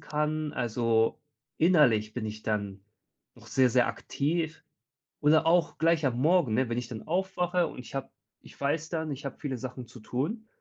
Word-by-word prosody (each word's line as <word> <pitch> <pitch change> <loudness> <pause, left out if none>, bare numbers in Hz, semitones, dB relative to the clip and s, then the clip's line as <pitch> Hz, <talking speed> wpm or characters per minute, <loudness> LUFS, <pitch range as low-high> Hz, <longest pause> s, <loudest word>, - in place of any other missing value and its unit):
kann. 150 0 -2
Also, 115 -1 +1 0.4
innerlich 125 -11 +4
bin 115 -3 -3
ich 110 0 -6
dann 100 -2 -2 0.5
auch - - -16
sehr, 130 -2 +3
sehr 120 -1 +3
aktiv 160 +7 -2 0.6
oder 155 +2 +4
auch 170 0 +2
gleich 165 -2 +3
am 125 -2 0
Morgen, 160 -7 +3
ne, 125 +1 +1
wenn 120 - -1
ich 120 -1 -3
dann 115 -3 -7
aufwache 180 0 +1
und - - -9
ich 125 - -9
habe 135 - -3 0.3
ich - - -16
weiß 150 +3 -1
dann, 160 -2 -2
ich 140 0 -6
habe 135 - -5
viele 135 -4 -3
Sachen 125 0 -6
zu 125 - -13
tun. 155 - -3
140 Hz, 180 wpm, -29 LUFS, 120-160 Hz, 0.6 s, innerlich